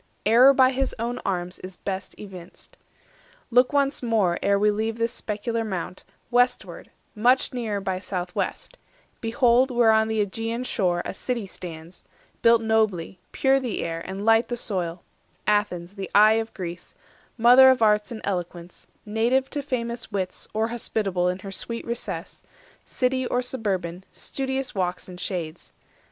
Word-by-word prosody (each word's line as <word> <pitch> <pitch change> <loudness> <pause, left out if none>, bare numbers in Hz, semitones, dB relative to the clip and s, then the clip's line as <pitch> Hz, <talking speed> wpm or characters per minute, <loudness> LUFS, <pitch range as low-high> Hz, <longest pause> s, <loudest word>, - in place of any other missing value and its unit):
Error 240 +5 +7
by 260 -1 +5
his 270 0 -1
own 235 +2 -3
arms 180 -1 -3
is 185 0 -10
best 190 -1 -5
evinced. 185 -4 -12 0.8
Look 250 +2 +4
once 280 -1 +1
more, 215 -8 +1
ere 200 0 +3
we 210 +1 +3
leave 220 +2 -2
this 230 0 -2
specular 225 +2 -2
mount, 190 -3 -5 0.3
Westward, 245 +1 +1 0.2
much 245 +5 +2
nearer 225 -5 -2
by 190 -1 -2
south 180 -2 -4
west; - - -4 0.4
behold 240 +2 +3
Where 240 -3 +4
on 220 0 +3
the 220 0 -1
AEgean 225 +4 -4
shore 180 -7 0
a - - -4
city 235 +2 -3
stands, 170 -2 -10 0.4
Built 230 -1 +5
nobly, 215 -6 0
pure 270 0 +3
the 250 -5 -3
air 165 0 -3
and 195 +2 -6
light 225 +1 +4
the 240 - -3
soil— 180 -6 -3 0.4
Athens, 200 -4 0
the 195 -2 -6
eye 215 +2 +6
of 225 - -8
Greece, 175 -1 -7 0.4
mother 250 +3 +8
of 255 -3 +3
arts 210 0 +3
240 240 - -5
And 200 - +2
Eloquence, 175 -1 -7 0.2
native 235 +5 +1
to 290 - -2
famous 235 -4 -4
wits 190 -2 -3
Or 220 +1 0
hospitable, 200 -6 -1
in 180 - -2
her 195 - -5
sweet 230 +4 -5
recess, 235 0 -5 0.4
City 255 0 -1
or 250 0 0
suburban, 190 -8 -3
studious 265 0 -3
walks 180 -2 -2
and 180 -1 -10
shades. 170 -4 -5
220 Hz, 160 wpm, -25 LUFS, 185-240 Hz, 0.8 s, mother